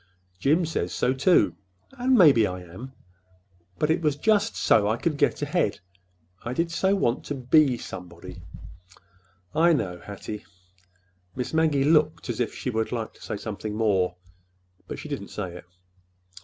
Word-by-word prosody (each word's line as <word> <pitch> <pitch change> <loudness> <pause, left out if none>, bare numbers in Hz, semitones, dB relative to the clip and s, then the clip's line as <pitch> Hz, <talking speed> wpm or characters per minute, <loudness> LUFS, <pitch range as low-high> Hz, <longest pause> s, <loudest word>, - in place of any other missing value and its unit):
Jim 155 - +3
says 90 - -2
so, 125 - +1
too. 140 +7 +3 0.4
And 260 -1 +2
maybe 140 - +6
I 90 0 -6
am. 95 +10 -10 0.9
But 150 - +1
it 170 +2 +1
was 150 -3 +1
just 215 +6 +2
so 105 -2 +3
I 110 +2 +1
could 155 +4 -1
get - - +1
ahead. - - 0 0.6
I 120 - -4
did 165 +5 -1
so 190 +3 +2
want 125 -10 0
to 145 - -3
be 130 0 +3
somebody!" 90 -3 -9 1.1
"I 165 +3 +4
know, 90 - -2
Hattie." 105 +1 -7 0.9
Miss 125 +3 -4
Maggie 155 -4 +2
looked 150 -3 +2
as 115 - -6
if 120 -3 0
she 125 - -3
would 110 -1 -1
like 115 -2 -3
to - - -21
say - - -4
something 105 0 -5
more—but 90 -3 -3
she - - -8
did - - -4
not - - -10
say 95 -4 -5
it. 90 - -10
125 Hz, 160 wpm, -25 LUFS, 95-155 Hz, 1.1 s, maybe